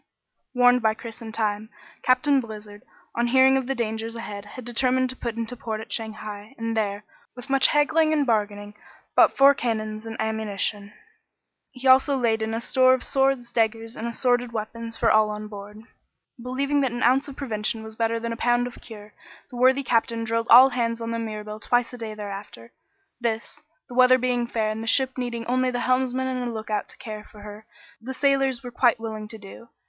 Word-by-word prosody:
Warned 245 0 +5
by 220 -1 +2
Chris 230 0 -9
in 225 -1 -7
time, 215 -1 -2 0.3
Captain 260 +2 +3
Blizzard, 210 -2 -10 0.3
on 235 +1 0
hearing 260 +2 +5
of 265 -2 -1
the 270 - -1
dangers 225 -1 -3
ahead, 205 -3 -7
had 235 +4 -10
determined 255 +1 +1
to - - -9
put 235 -3 -5
into 230 +1 -4
port 220 -2 -5
at 220 -1 -10
Shanghai, 215 +1 -6
and 230 0 -3
there, 205 -2 -1 0.3
with 250 +2 -9
much 275 -1 +5
haggling 310 +2 +3
and 300 -2 +2
bargaining, 205 -3 -1 0.4
bought - - +5
four 275 +1 +7
cannons 220 -3 -3
and 225 0 -7
ammunition. 210 -2 -2 0.8
He 260 0 -5
also 265 +2 +5
laid 225 -3 +1
in 220 0 -2
a - - -1
store 255 +2 +4
of 255 - -7
swords, 270 -3 0
daggers, 225 0 -1
and 230 - -4
assorted 245 0 0
weapons 230 +1 -5
for 230 - +3
all 215 0 +4
on 210 0 -5
board. 210 +1 -10 0.6
Believing 275 +4 0
that 265 -3 0
an 240 - -3
ounce 260 +4 +3
of 280 - -8
prevention 220 -4 -2
was 220 0 -9
better 230 0 0
than 230 0 -3
a - - -7
pound 240 +1 +2
of 245 - -9
cure, 210 -2 -11 0.4
the - - -9
worthy 260 +2 +4
captain 230 -1 +1
drilled 230 0 -1
all 255 +3 +9
hands 235 -2 -1
on 230 0 -4
the 230 - -2
Mirabelle 215 -1 -6
twice 245 +2 0
a - - -7
day 220 -2 -6
thereafter. 200 - -8 0.5
This, 230 -2 -3 0.3
the 250 - -11
weather 255 +1 +6
being 245 -1 0
fair 220 -2 -1
and 215 +1 -5
the 225 - -6
ship 260 +2 +3
needing 240 -2 -4
only 255 +1 +1
the 245 -1 -2
helmsman 255 0 +1
and 250 -2 -2
a - - -4
lookout 215 -2 -3
to - - -12
care 215 -4 -7
for 210 -1 -16
her, 210 +1 -11 0.3
the 260 +3 -6
sailors 270 -3 +1
were 245 - -7
quite 240 -1 +2
willing 220 -1 -6
to 220 - -9
do. 210 +3 -13
230 Hz, 205 wpm, -24 LUFS, 220-255 Hz, 0.8 s, all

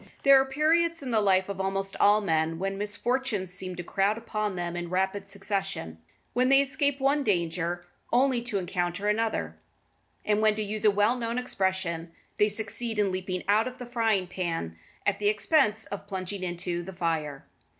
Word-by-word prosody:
There 275 -1 +8
are - - 0
periods 320 +4 +2
in 255 - -4
the 220 -2 +3
life 190 -2 +3
of 200 -1 -4
almost 195 0 -2
all 205 +1 +5
men 160 -4 +1
A - - -6
when 195 +3 -2
misfortunes 210 -1 -2
seem 185 0 -4
to 175 - -5
crowd 200 +4 +1
upon 215 -3 -3
them 175 -1 -3
in 175 0 -4
rapid 190 +2 -1
succession, 195 - -3 0.3
when 250 +1 +2
they 275 0 +7
escape 280 0 +1
from 270 - -8
one 285 +1 +3
danger 175 -3 -1 0.3
only 255 0 +3
to 235 -4 -2
encounter 180 +1 -2
another, 220 +1 0 0.7
and 210 0 +2
when, 215 -1 +4
to 215 - -2
use 210 +1 -4
a - - +8
well 205 +4 +3
known 235 -1 -3
expression, 190 -8 -1 0.3
they 210 - +5
succeed 220 +2 -3
in 205 -2 +2
leaping 185 0 -3
out 215 +4 +3
of 255 0 -7
the 250 - -7
frying 225 -5 +1
pan 170 - -3 0.3
at 200 -1 +1
the 205 - +1
expense 215 +1 +2
of 200 0 -7
plunging 190 0 -4
into 175 -1 -2
the 190 +2 -8
fire. 160 -5 -2
200 Hz, 190 wpm, -28 LUFS, 185-230 Hz, 0.7 s, There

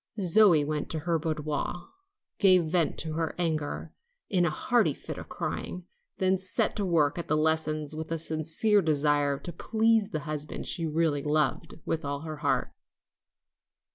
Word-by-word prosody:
Zoe 185 -5 +5
went 150 0 -3
to 160 - -3
her 165 0 0
boudoir, 155 +2 -3 0.5
gave 185 -5 +5
vent 170 -3 +1
to 160 -2 -1
her 160 0 -2
anger 160 -4 -2 0.4
in 180 -3 +3
a - - +2
hearty 200 - +1
fit - - -7
of - - -10
crying, 180 -1 -4 0.3
then 190 0 +2
set 185 0 +1
to 205 - 0
work 160 -2 +2
at 170 - -5
the 155 - +1
lessons 155 -1 0
with 160 +1 -6
a 165 - 0
sincere 160 +7 +1
desire 145 -3 +1
to 175 +4 -6
please 220 +3 +2
the 155 -8 -3
husband 150 0 -5
she 165 -2 0
really 155 -2 +1
loved 150 +2 0
with 160 - -2
all 140 0 -3
her 155 -1 -6
heart. - - 0
160 Hz, 165 wpm, -28 LUFS, 150-180 Hz, 0.5 s, Zoe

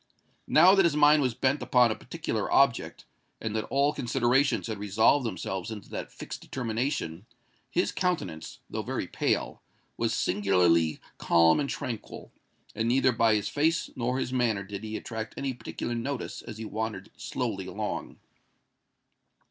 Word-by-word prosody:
Now 175 +5 +7
that 195 -1 +5
his 170 -4 +2
mind 150 0 +6
was 125 -4 0
bent 130 +3 +1
upon 125 -3 +4
a - - -1
particular - - -4
object, - - +2 0.3
and 110 -1 -4
that 110 - -1
all 140 +2 +2
considerations 125 -3 +1
had 110 -3 -4
resolved 110 +6 +3
themselves 95 -1 -4
into 105 -3 -8
that - - -5
fixed - - -8
determination, 115 - -3 0.4
his 175 +7 +1
countenance, 180 - -3
though - - -4
very - - -3
pale, - - -1 0.4
was - - 0
singularly 90 -5 +2 0.2
calm 85 - +4
and 140 -1 -1
tranquil; 120 -6 -6 0.4
and 115 - -1
neither 130 +2 +4
by 115 -2 +3
his 105 - -1
face 160 +3 0
nor 125 0 -1
his 130 -1 -2
manner 115 -6 +1
did 100 +1 -7
he 110 0 -4
attract 110 -1 -6
any 135 -1 -2
particular 120 -1 -5
notice 125 +3 -4
as 110 - -9
he 110 - -6
wandered 110 -2 -4
slowly 115 -5 -3
along. 105 +2 -4
115 Hz, 155 wpm, -28 LUFS, 105-135 Hz, 0.4 s, Now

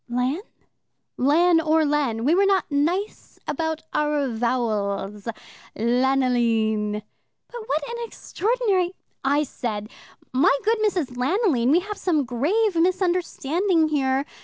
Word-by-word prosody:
"Lan?" 250 +6 0 0.8
"Lan 325 +5 +4
or 315 0 +2
Len. 275 -6 0
We 305 - +4
were 390 +2 +4
not 385 -5 +1
nice 345 +9 -1
about 320 +1 -2
our 295 -2 0
vowels. 215 -4 -2 0.5
Lanoline." 230 -4 +1 0.4
"But 480 -1 -8
what 290 0 -1
an 470 - -5
extraordinary 405 -6 -1 0.2
" - - -50
"I 300 - +2
said, 215 -6 -5 0.4
'My 270 +2 +4
good 445 +1 +2
Mrs. 355 - -1
Lanoline, 270 - +1
we 330 +5 +4
have 415 +2 -7
some 310 -6 +1
grave 345 - +1
misunderstanding 350 -1 +1
here. 270 -2 +1
295 Hz, 120 wpm, -23 LUFS, 245-360 Hz, 0.8 s, Lan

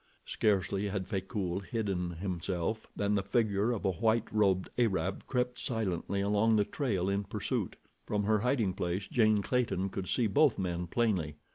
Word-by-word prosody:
Scarcely 100 -1 +1
had 100 -1 -2
Frecoult 95 -1 -3
hidden 100 -6 -2
himself 90 +3 -3
than 100 0 0
the 100 - +2
figure 105 +1 +1
of 115 - -3
a 95 - +3
white 110 +5 +1
robed 95 -4 +2
Arab 95 -5 0
crept 125 -1 -1
silently 100 -4 -1
along 105 +3 +3
the 105 -1 +3
trail 100 - -1
in 100 +1 0
pursuit. - - -3 0.3
From 105 -1 0
her 110 +1 +2
hiding 115 -4 +1
place, 90 +2 -2
Jane 110 -4 +3
Clayton 115 -7 0
could 95 -1 -5
see 120 - +2
both 120 +6 +4
men 90 -2 -2
plainly. 90 -8 0
100 Hz, 160 wpm, -31 LUFS, 95-110 Hz, 0.3 s, both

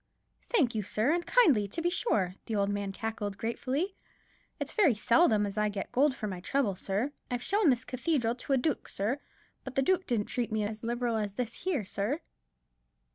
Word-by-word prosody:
"Thank 285 - +3
you, 215 - 0
sir, 215 +6 +1
and 345 0 0
kindly, 325 - +4
to 200 - -4
be 345 +1 +1
sure," 195 - +1
the 225 - -2
old 200 -1 +1
man 205 -1 -2
cackled, 205 -1 -4
gratefully. 265 - -2 0.7
"It's - - -2
very 340 - +4
seldom 220 -1 +4
as 205 +1 -3
I 210 0 +2
get 200 -2 -5
gold 275 +1 +3
for 220 - -5
my 185 -3 -4
trouble, 220 +2 0
sir. 200 +9 -1 0.2
I've 245 0 -2
shown 405 -4 +3
this 250 -2 +2
cathedral 255 -3 0
to 255 +3 -3
a - - +5
dook, 270 +2 -1
sir; 220 +8 -1 0.4
but 265 -1 -8
the 270 - +3
dook 370 +5 +1
didn't 225 -5 +1
treat 240 -2 -2
me 215 -1 0
as 215 +1 -4
liberal 235 0 -1
as 205 -2 -2
this 230 +1 -3
here, 325 - -2
sir." 210 - -1
235 Hz, 200 wpm, -30 LUFS, 210-285 Hz, 0.7 s, a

